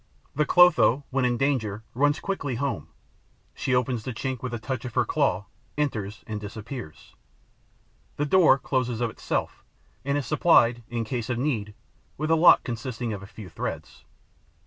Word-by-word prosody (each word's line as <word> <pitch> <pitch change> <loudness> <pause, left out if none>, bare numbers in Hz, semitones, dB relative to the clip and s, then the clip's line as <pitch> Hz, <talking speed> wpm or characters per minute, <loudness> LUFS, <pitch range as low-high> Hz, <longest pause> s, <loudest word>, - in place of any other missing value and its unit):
The 150 0 +1
Clotho, 175 -7 +5
when 135 -1 +1
in 120 -1 +1
danger, 110 -7 -1
runs 145 +4 +2
quickly 145 -10 -3
home; 130 - -3 0.7
she 130 - -1
opens 125 -1 0
the 125 -1 -5
chink 130 0 -3
with 130 - -4
a 120 - -3
touch 120 +2 -4
of 125 -3 -7
her 125 -2 +3
claw, 135 -8 0 0.3
enters 110 -8 -2
and 105 -1 -5
disappears. 105 - -8 1.0
The 145 - -1
door 160 -4 +5
closes 125 -3 -1
of 120 -2 -1
itself - - -3 0.4
and 140 +1 0
is 145 - -2
supplied, 120 -5 +4
in 120 -1 -2
case 115 0 -4
of 120 - -1
need, 115 -6 -2 0.4
with 155 +2 -1
a - - +6
lock 165 +2 +6
consisting 120 -1 -4
of 100 - -6
a 95 - -10
few 105 -1 -11
threads. 85 - -6
125 Hz, 170 wpm, -26 LUFS, 110-140 Hz, 1.0 s, a